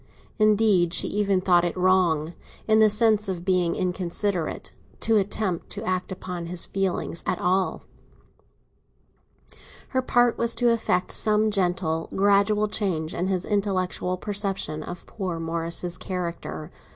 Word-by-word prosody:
Indeed, 210 Hz, -5 st, +4 dB
she -, -, +3 dB
even 200 Hz, -2 st, +1 dB
thought 175 Hz, -2 st, +4 dB
it 175 Hz, +1 st, -2 dB
wrong—in 180 Hz, +3 st, +1 dB
the 215 Hz, -1 st, +6 dB
sense 215 Hz, -1 st, +2 dB
of 180 Hz, -2 st, -4 dB
being 180 Hz, -3 st, +2 dB
inconsiderate—to 185 Hz, +4 st, -2 dB
attempt 195 Hz, -3 st, -1 dB
to -, -, -6 dB
act 185 Hz, +1 st, -2 dB
upon 180 Hz, -2 st, -6 dB
his 175 Hz, 0 st, 0 dB
feelings 190 Hz, -3 st, -2 dB
at 185 Hz, -, 0 dB
all; 185 Hz, +2 st, 0 dB, 2.1 s
her 260 Hz, -, 0 dB
part 245 Hz, -1 st, +2 dB
was 235 Hz, 0 st, +3 dB
to 240 Hz, 0 st, +3 dB
effect 185 Hz, -5 st, 0 dB
some 215 Hz, 0 st, +2 dB
gentle, 175 Hz, -4 st, -1 dB
gradual 205 Hz, +2 st, +3 dB
change 185 Hz, -7 st, -2 dB
in 180 Hz, -, -2 dB
his 185 Hz, -1 st, -1 dB
intellectual 185 Hz, -3 st, -1 dB
perception 195 Hz, -6 st, -3 dB
of 175 Hz, +3 st, -8 dB
poor 185 Hz, -5 st, -4 dB
Morris's 170 Hz, +2 st, -3 dB
character. 175 Hz, -3 st, -5 dB
185 Hz, 125 wpm, -25 LUFS, 175-210 Hz, 2.1 s, the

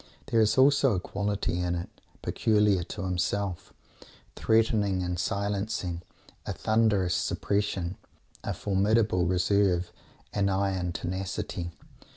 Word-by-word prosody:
There 115 Hz, -, +4 dB
is 110 Hz, +3 st, +2 dB
also 135 Hz, -3 st, +5 dB
a -, -, 0 dB
quality 100 Hz, -2 st, -2 dB
in 90 Hz, 0 st, 0 dB
it 85 Hz, -, -7 dB, 0.2 s
peculiar 105 Hz, -4 st, +2 dB
to 100 Hz, -, -6 dB
himself 95 Hz, 0 st, -2 dB, 0.6 s
threatening 110 Hz, -4 st, +2 dB
and 90 Hz, -1 st, -2 dB
silencing; 100 Hz, -2 st, -2 dB, 0.5 s
a -, -, -1 dB
thunderous 110 Hz, -5 st, +2 dB
suppression, 100 Hz, -3 st, -1 dB, 0.5 s
a -, -, -3 dB
formidable 100 Hz, -2 st, +2 dB
reserve, 90 Hz, -1 st, +2 dB, 0.4 s
an 100 Hz, -1 st, +1 dB
iron 95 Hz, -2 st, 0 dB
tenacity. 90 Hz, -1 st, -4 dB
100 Hz, 110 wpm, -28 LUFS, 90-105 Hz, 0.6 s, also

